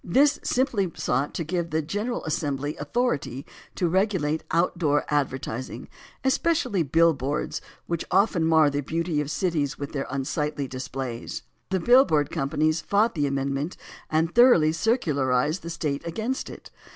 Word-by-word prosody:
This 280 +10 +3
simply 235 -8 +1
sought 135 +4 -1
to 165 - -1
give 170 +1 -2
the 160 0 0
General 210 +10 -3
Assembly 145 -1 -2
authority 150 - -1 0.3
to 180 - +1
regulate 180 -4 +1
outdoor 165 -3 +1
advertising, 130 -3 -2 0.3
especially 265 - +1
billboards, 150 -2 +1 0.2
which 170 -1 -2
often 190 -2 +3
mar 160 -2 +4
the 145 +1 -1
beauty 165 +1 -1
of 145 - -4
cities 155 -5 0
by 140 - -4
their 140 -1 -4
unsightly 140 +1 -2
displays. 130 -2 -5 0.3
The 190 0 0
bill 250 +8 +6
board 150 - +1
companies 155 +1 0
fought 210 +6 +2
the 145 -4 0
amendment 140 +3 -2 0.3
and 160 +2 +1
thoroughly 240 -11 +6
circularized 155 - +1
the 170 - -7
State 155 -4 -2
against 225 +10 -3
it. - - -11
160 Hz, 140 wpm, -25 LUFS, 145-185 Hz, 0.3 s, bill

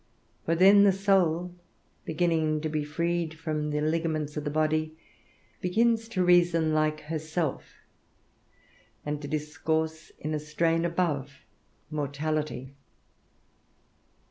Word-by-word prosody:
For 165 - +1
then 195 +4 +7
the 200 - +6
soul, 180 -3 +1 0.5
beginning 160 -2 +1
to 155 - -2
be 155 -1 -1
freed 170 +2 -2
from 155 -2 -2
the 150 0 -1
ligaments 155 -1 -1
of 150 - -3
the 150 - -2
body, 155 +1 0 0.6
begins 225 +5 +2
to 190 -6 0
reason 170 -3 +4
like 155 0 +1
herself, 155 -1 -3 1.3
and 150 0 -3
to 145 - -6
discourse 160 +1 -2
in 155 +1 -4
a 155 - -1
strain 165 +2 0
above 150 -7 -2 0.5
mortality. 150 -2 -3
155 Hz, 115 wpm, -28 LUFS, 150-170 Hz, 1.3 s, then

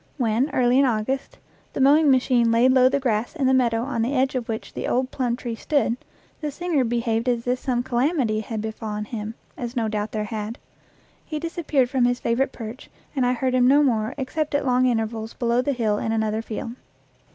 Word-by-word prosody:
When, 240 +2 +1
early 250 -1 +3
in 275 - +5
August, 250 +3 -1 0.4
the - - -4
mowing 290 +3 +5
machine 250 -3 +3
laid 240 +3 +4
low 255 -1 +6
the 280 +1 +1
grass 240 +1 -1
in 285 -5 0
the 260 - +4
meadow 235 -3 +2
on 250 -3 -2
the 250 +5 0
edge 265 +1 +2
of 250 -3 -3
which 220 -1 -5
the - - -4
old 255 +1 0
plum 245 -3 -1
tree 240 -1 -5
stood, 255 0 0 0.4
the 300 - -3
singer 315 -1 0
be 235 0 0
haved 230 +1 0
as 235 -1 -1
if 250 +1 0
some 245 -2 -1
calamity 250 -3 +1
had 220 0 -4
befallen 215 -1 -4
him, 215 0 -5 0.2
as 240 0 -6
no 230 -2 0
doubt 210 -1 -2
there 215 -1 -2
had. 215 +1 -5 0.7
He 310 - -5
disappeared 305 -5 0
from 260 -3 +2
his 245 0 +1
favorite 250 +3 0
perch, 230 +1 -8 0.3
and 255 -3 +2
I 250 - +2
heard 255 +1 -1
him 250 -1 +4
no 285 +3 +5
more 220 -5 0
except 295 +2 -2
at 285 - 0
long 255 0 +3
intervals 225 -1 -2
below 235 0 +1
the 285 - 0
hill 220 -5 0
in 225 - -2
another 220 0 0
field. 225 0 -5
245 Hz, 215 wpm, -23 LUFS, 225-265 Hz, 0.7 s, low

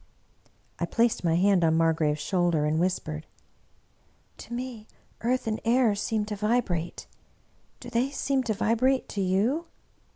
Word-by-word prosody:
I - - -1
placed 230 -3 +1
my 165 -2 +2
hand 190 0 +3
on 160 0 +3
Margrave^s 160 -2 +2
shoulder 170 -1 +1
and 155 +1 +1
whispered, 160 -3 -2 0.6
" - - -39
To - - -11
me 240 -3 -6 0.3
earth 250 +3 0
and 220 -1 -2
air 235 -1 +3
seem 210 +1 -1
to 210 0 -4
vibrate. 205 -6 -1 0.7
Do 245 - -10
they 245 +3 +1
seem 275 -1 0
to 220 - 0
vibrate 255 +5 +1
to 200 - -3
you 215 - +1
210 Hz, 150 wpm, -27 LUFS, 170-240 Hz, 0.7 s, hand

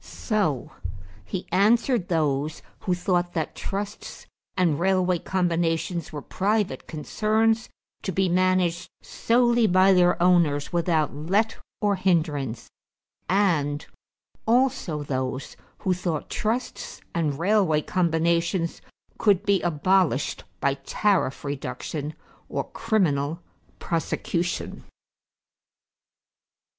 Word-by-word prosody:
So 195 - -1 0.5
he 180 - -5
answered 225 +1 +3
those 150 -2 0 0.2
who 180 - 0
thought 175 -1 0
that 160 -2 -2
trusts 200 +1 -6 0.3
and 170 -6 +2
railway 185 -1 +2
combinations 170 -2 -1
were 150 -2 -6
private 200 -7 -1
concerns 220 +8 0 0.3
to 190 - -3
be 190 +2 +1
managed 180 -1 +1
solely 240 -1 +2
by 185 +1 +5
their 180 -1 +4
owners 170 -5 +3
without 165 -3 +1
let 195 +10 0 0.3
or 205 -2 +2
hindrance 150 - 0 0.6
and 160 -7 +1 0.6
also 235 - +1
those 130 -1 -3 0.3
who 185 - +3
thought 175 -4 -3
trusts 230 +3 -3
and 155 -5 0
railway 175 -4 +2
combinations 170 0 0 0.4
could 205 -2 +3
be 200 -2 +3
abolished 175 -3 +1 0.2
by 140 - +2
tariff 185 -7 0
reduction 145 +2 -4 0.3
or - - -1
criminal 165 -9 0 0.4
prosecution. 170 +1 -2
175 Hz, 95 wpm, -25 LUFS, 155-195 Hz, 0.6 s, by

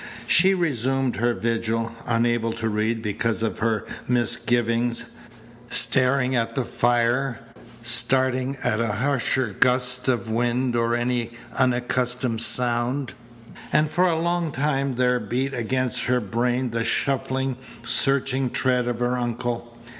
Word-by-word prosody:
She 190 +3 +4
resumed 135 - 0
her 120 +2 +1
vigil, 115 +2 -1 0.2
unable 115 -1 +1
to 115 0 -3
read 110 +1 -1
because 110 +2 -1
of 115 - -2
her 110 -1 0 0.2
misgivings, 120 0 0 0.6
staring 125 +2 +3
at 115 -1 -1
the 130 - -1
fire, 120 +2 +1 0.4
starting 130 +2 +2
at 110 - 0
a 115 -2 0
harsher 130 -2 0
gust 125 0 +2
of 120 -3 0
wind 120 +2 0
or 115 0 +1
any 120 -1 -1 0.2
unaccustomed 125 -1 0
sound. 120 +3 +1 0.6
And 150 0 +2
for 180 +1 +3
a 165 -2 +1
long 170 -1 0
time 140 -1 -1
there 125 0 +2
beat 125 +5 -2
against 130 +1 -1
her 125 0 +2
brain 120 +3 -1
the 115 0 -1
shuffling, 130 0 -1 0.3
searching 135 +1 +1
tread 125 0 0
of 120 0 -3
her 125 +1 0
uncle. 120 0 -4
120 Hz, 130 wpm, -24 LUFS, 115-130 Hz, 0.6 s, She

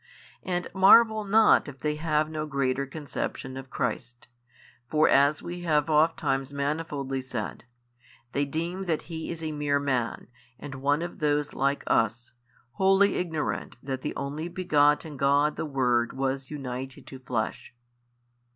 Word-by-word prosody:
And 180 -2 -2
marvel 220 +3 +6
not 215 -2 +5
if 135 -2 -10
they 150 -1 0
have 155 -1 +1
no 155 -1 -4
greater 140 -1 -1
conception 140 -2 -5
of 135 0 -8
Christ: 120 -2 -4 0.6
for 155 0 +4
as 140 +2 +4
we 175 +1 -6
have 155 -2 +1
ofttimes 150 -3 +2
manifoldly 140 -2 -2
said, 120 -4 -5 0.7
they 140 - 0
deem 170 +6 -3
that 165 -4 -1
He 160 -2 -6
is 165 -1 -5
a 155 - -2
mere 145 -1 0
Man 130 -5 -1 0.3
and 135 0 -8
one 145 +4 +2
of 175 - -7
those 150 -1 0
like 140 +1 0
us, 115 +2 0 0.4
wholly 195 +6 +4
ignorant 160 -7 -3
that 130 -1 -4
the - - -4
Only 150 +4 -4
Begotten 150 -4 +2
God 140 +2 +3
the 160 - -3
Word 125 -4 +1
was 135 0 -2
united 130 -2 -6
to 135 - -10
flesh. 120 -1 -4
145 Hz, 145 wpm, -27 LUFS, 135-160 Hz, 0.7 s, marvel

